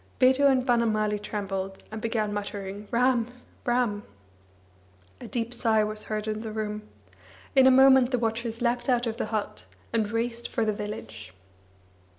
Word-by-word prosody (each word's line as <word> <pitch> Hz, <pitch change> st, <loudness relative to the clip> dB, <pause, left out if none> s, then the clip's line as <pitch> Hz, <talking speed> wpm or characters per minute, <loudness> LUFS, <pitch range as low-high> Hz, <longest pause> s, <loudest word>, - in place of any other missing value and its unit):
Bidhu 265 Hz, +2 st, +5 dB
and 260 Hz, -2 st, +2 dB
Banamali 215 Hz, -4 st, +1 dB
trembled, 195 Hz, -2 st, -4 dB
and 220 Hz, 0 st, -6 dB
began 220 Hz, -2 st, -1 dB
muttering: 205 Hz, 0 st, -5 dB
"Ram, 240 Hz, -1 st, +2 dB, 0.4 s
Ram." 240 Hz, -4 st, +1 dB, 1.2 s
A -, -, -8 dB
deep 235 Hz, 0 st, -3 dB
sigh 225 Hz, -3 st, +2 dB
was 215 Hz, 0 st, -3 dB
heard 215 Hz, 0 st, -3 dB
in 215 Hz, 0 st, -2 dB
the 220 Hz, -1 st, -5 dB
room. 215 Hz, -1 st, -3 dB, 0.7 s
In 265 Hz, -1 st, +7 dB
a -, -, +9 dB
moment 265 Hz, -1 st, +6 dB
the 250 Hz, -, +1 dB
watchers 230 Hz, 0 st, -2 dB
leapt 240 Hz, +1 st, 0 dB
out 245 Hz, -1 st, +2 dB
of 230 Hz, -1 st, -3 dB
the -, -, -2 dB
hut, 205 Hz, -, -4 dB, 0.3 s
and 220 Hz, -2 st, +1 dB
raced 235 Hz, +1 st, -2 dB
for 230 Hz, -, 0 dB
the 215 Hz, -, +1 dB
village. 110 Hz, -, -7 dB
225 Hz, 160 wpm, -27 LUFS, 210-240 Hz, 1.2 s, a